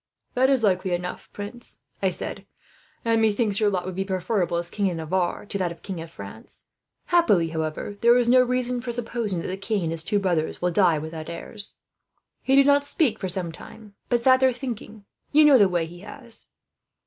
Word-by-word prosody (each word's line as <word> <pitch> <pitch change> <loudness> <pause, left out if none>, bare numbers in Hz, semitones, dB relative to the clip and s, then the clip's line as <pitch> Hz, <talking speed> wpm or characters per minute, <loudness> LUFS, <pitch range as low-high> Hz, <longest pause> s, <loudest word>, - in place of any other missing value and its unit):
"'That 260 +1 +3
is 265 -4 +2
likely 185 -2 +1
enough, 180 +1 -4
prince,' 205 +4 -8 0.2
I - - +3
said; - - -6 0.6
'and 225 -1 +3
methinks 215 -1 +2
your 210 -2 +3
lot 185 -3 -2
would 185 - -4
be 190 +2 -2
preferable, 185 -2 -1
as 170 0 -4
King 200 -2 0
of 175 - -4
Navarre, 175 +4 -1
to 200 -1 -4
that 180 -2 0
of 170 - -12
King 185 -4 -5
of 165 - -8
France. 100 -1 -11 0.4
However, 335 - +4 0.3
happily 205 - -6
there 235 +1 +6
is 245 -1 +2
no 255 +1 +6
reason 250 0 0
for 240 0 -4
supposing 230 -6 -2
that - - -5
the 185 - -4
king 200 0 -2
and 160 - -1
his 165 -1 -3
two 205 - 0
brothers 175 -5 0
will 180 0 0
die 175 -3 +3
without 155 +1 -6
heirs.' 200 +5 -4 0.7
"He 265 - +2
did 275 0 +6
not 285 0 +4
speak 285 -5 +1
for 190 - -3
some 180 -2 -2
time, 210 +5 -13 0.2
but 240 -1 +1
sat 260 0 +6
there 260 0 +4
thinking. 220 -5 -7 0.3
You 300 +1 +6
know 280 -4 +7
the 200 -2 +5
way 175 -2 0
he 175 +2 -11
has. 235 +3 -11
205 Hz, 210 wpm, -24 LUFS, 175-240 Hz, 0.7 s, know